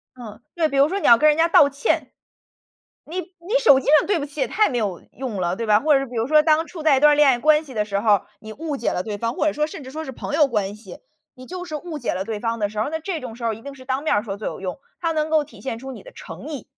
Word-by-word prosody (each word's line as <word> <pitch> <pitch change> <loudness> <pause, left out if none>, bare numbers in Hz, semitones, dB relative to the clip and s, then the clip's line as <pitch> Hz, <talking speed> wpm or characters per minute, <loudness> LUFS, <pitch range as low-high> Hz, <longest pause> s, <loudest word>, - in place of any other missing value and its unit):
嗯， 225 -3 -11
对。 330 -2 +2
比 275 - -2
如 280 +2 +5
说 390 +3 -2
你 - - 0
要 235 - +8
跟 305 - +4
人 300 - +2
家 330 +1 +4
道 295 -4 +6
歉， 280 +10 -1 0.9
你 335 +4 -7
你 360 +4 -7
手 275 - +7
机 - - -9
上 - - -3
“对 390 -4 +1
不 285 - -3
起” 290 0 -7
也 260 - +1
太 425 - +2
没 250 - -2
有 200 -6 -3
用 250 -7 -5
了， 175 0 0
对 230 - -4
吧。 210 0 +5
或 300 +5 +3
者 275 - +5
是 - - -3
比 245 - -10
如 225 +1 0
说 305 +1 +5
当 315 +1 +3
处 320 0 -9
在 300 -4 +5
一 - - +2
段 295 +1 +6
恋 295 -2 +6
爱 245 -2 +2
关 305 +4 +4
系 275 -4 -12
的 210 -2 -1
时 200 -1 -2
候， 205 -2 +3 0.2
你 215 0 -9
误 300 +2 -4
解 235 - -1
了 180 - -2
对 210 -1 -5
方， 230 +2 -2
或 - - 0
者 305 - +1
说 300 +1 0
甚 310 - -9
至 260 - -10
说 315 +3 -5
是 265 - -6
朋 265 - -7
友 300 -2 +4
关 205 -5 -2
系， 215 -2 -12 0.4
你 255 -1 -12
就 360 +4 -7
是 310 - -6
误 315 0 -6
解 240 - -2
了 185 +1 -3
对 220 -1 -4
方 230 +1 -2
的 205 -1 0
时 210 0 -6
候， 225 - -1
那 320 +1 -3
这 335 0 -4
种 245 -3 -7
时 240 - -11
候 225 - +1
一 220 - -10
定 280 +2 -9
是 260 -1 -14
当 265 +2 -2
面 310 - +2
儿 205 - 0
说 200 -3 -5
最 215 - -5
有 - - -5
用， 185 +6 -5 0.2
它 335 -2 -1
能 310 0 -1
够 310 -1 +3
体 225 -7 -16
现 230 -1 -4
出 265 +2 -8
你 255 - -10
的 - - -13
诚 - - -10
意。 290 -7 -6
270 Hz, 355 characters per minute, -22 LUFS, 225-310 Hz, 0.9 s, 要